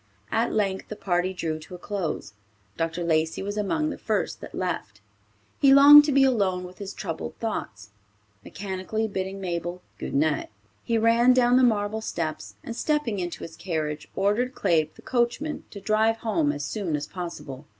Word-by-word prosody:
At 230 +1 +1
length 195 -3 -1
the 215 - -6
party 180 -2 0
drew 160 -4 -3
to 160 +3 -10
a - - -8
close. 175 - -4 0.4
Dr. 165 +1 -2
Lacey 160 +1 +1
was 205 +1 -4
among 305 +10 0
the - - -7
first 215 -3 -2
that - - -9
left. 170 - -3 0.6
He 275 - +6
longed 290 +1 +10
to 295 - +1
be 275 0 +5
alone 200 -8 +2
with 180 0 -11
his 200 -1 -5
troubled - - -5
thoughts. 105 - -5 0.5
Mechanically 200 +3 -3
bidding 190 -1 -4
Mabel 175 -1 -4 0.2
"Good - - -4
night," 150 +1 +1 0.3
he 230 - +1
ran 230 +3 +5
down 245 -1 +4
the 260 - +6
marble 220 -2 +2
steps, 155 - -4
and 230 - -6
stepping 295 -8 0
into 175 -1 -4
his 165 - -8
carriage, 155 -4 -3
ordered 215 +6 +1
Claib, 155 -2 +2
the - - -16
coachman, 255 +5 -1
to 200 - -9
drive 220 +2 +2
home 185 -11 +1
as 145 -1 -4
soon 175 +1 -2
as 145 0 -3
possible. 155 -6 -7
195 Hz, 175 wpm, -26 LUFS, 165-225 Hz, 0.6 s, longed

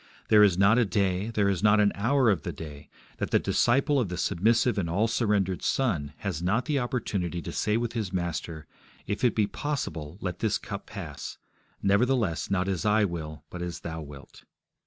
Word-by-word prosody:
There 105 -1 +7
is 100 -4 +5
not 100 +5 +5
a - - +5
day, 100 0 0
there 105 -3 +1
is 95 -3 0
not 105 0 +5
an 105 -1 +4
hour 120 +2 +3
of 90 -7 0
the - - -4
day, 75 -3 -9 0.3
that - - -2
the - - +4
disciple 135 +4 +2
of 115 -7 0
the 90 - -4
submissive 110 +7 +2
and 85 -4 -2
all 100 +7 +2
surrendered 105 -5 0
Son 85 - 0
has 95 -6 -4
not 100 +8 +1
the 150 -3 +1
opportunity 105 - -2
to 80 - -6
say 105 +1 0
with 120 -1 -2
his 110 -5 -3
Master, 85 -3 -3 0.4
If 105 - -3
it 125 - +3
be 110 - +3
possible, 90 - -4
let 90 -3 -4
this 110 -3 +1
cup - - -7
pass: - - -7 0.5
nevertheless, 100 - +2
not 95 -1 0
as 95 -2 -1
I 105 0 +3
will, 80 -4 -6
but 90 - -6
as 90 -1 -5
Thou 80 -1 -5
wilt. 70 -2 -12
100 Hz, 200 wpm, -27 LUFS, 85-115 Hz, 0.5 s, There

